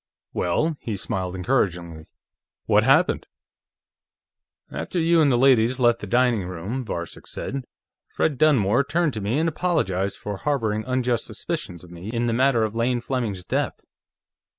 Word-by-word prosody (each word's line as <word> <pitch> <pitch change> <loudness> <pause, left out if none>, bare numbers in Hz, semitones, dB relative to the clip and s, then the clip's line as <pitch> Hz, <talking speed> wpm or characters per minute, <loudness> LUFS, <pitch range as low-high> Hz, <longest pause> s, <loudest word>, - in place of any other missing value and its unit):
"Well?" 150 - 0
He 110 -4 -4
smiled 95 -3 -3
encouragingly. 90 -6 -1 0.6
"What - - +4
happened?" - - +3 1.4
"After 180 - -3
you 165 0 +4
and 145 -3 +4
the 120 - +3
ladies 125 -1 +4
left 120 -2 +3
the 105 - -7
dining 120 -3 +2
room," 95 +9 -4
Varcek 85 -6 -6
said, 135 -1 -5 0.4
"Fred 145 -5 -1
Dunmore 130 -5 +4
turned 155 +1 0
to 110 - -4
me 105 +7 0
and 160 +2 +2
apologized 145 - 0
for 105 -1 -5
harboring 110 -5 -1
unjust 125 -2 0
suspicions 100 - -5
of 90 - -14
me 85 +4 -8
in 120 +1 -1
the 115 - 0
matter 125 -1 +3
of 110 0 -2
Lane 120 +1 +1
Fleming's 115 -7 -3
death. - - -1
120 Hz, 150 wpm, -24 LUFS, 100-135 Hz, 1.4 s, What